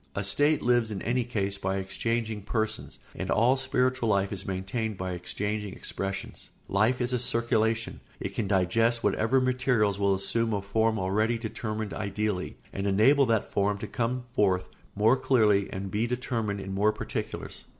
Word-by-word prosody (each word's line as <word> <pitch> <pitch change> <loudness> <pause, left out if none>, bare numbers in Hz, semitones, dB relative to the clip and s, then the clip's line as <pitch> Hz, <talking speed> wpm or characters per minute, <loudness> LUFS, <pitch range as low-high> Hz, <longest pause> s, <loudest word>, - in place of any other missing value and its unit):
A 100 - -1
state 145 +9 +3
lives 120 -2 +3
in 100 -3 -5
any 125 +3 +1
case 100 -5 -2
by 95 0 -1
exchanging 110 +3 -2
persons, 110 +1 -3 0.2
and - - -5
all 120 +4 +4
spiritual 130 -2 0
life 100 -1 +1
is 95 -1 -7
maintained 100 +3 -3
by 95 0 -3
exchanging 105 +3 -3
expressions. 100 0 -5 0.2
Life 110 +6 +2
is 125 +1 0
a 125 - +1
circulation; 115 -2 0 0.2
it - - -4
can 110 - -2
digest 115 +5 +2
whatever 120 +4 +2
materials 125 -6 +1
will 100 -1 +3
assume 115 +4 0
a 100 - 0
form 110 +2 +1
already 110 +5 +1
determined 110 -1 -4
ideally 100 -2 -2 0.2
and 100 +1 -2
enable 130 +8 +5
that 110 -2 +1
form 100 0 +1
to - - -5
come 125 +2 -2
forth 95 -5 +2 0.3
more 110 +5 +4
clearly 105 -7 +3
and 95 0 -5
be 110 +3 0
determined 115 -4 -2
in 95 0 -5
more 105 +2 +3
particulars. - - -5
110 Hz, 165 wpm, -28 LUFS, 100-120 Hz, 0.3 s, enable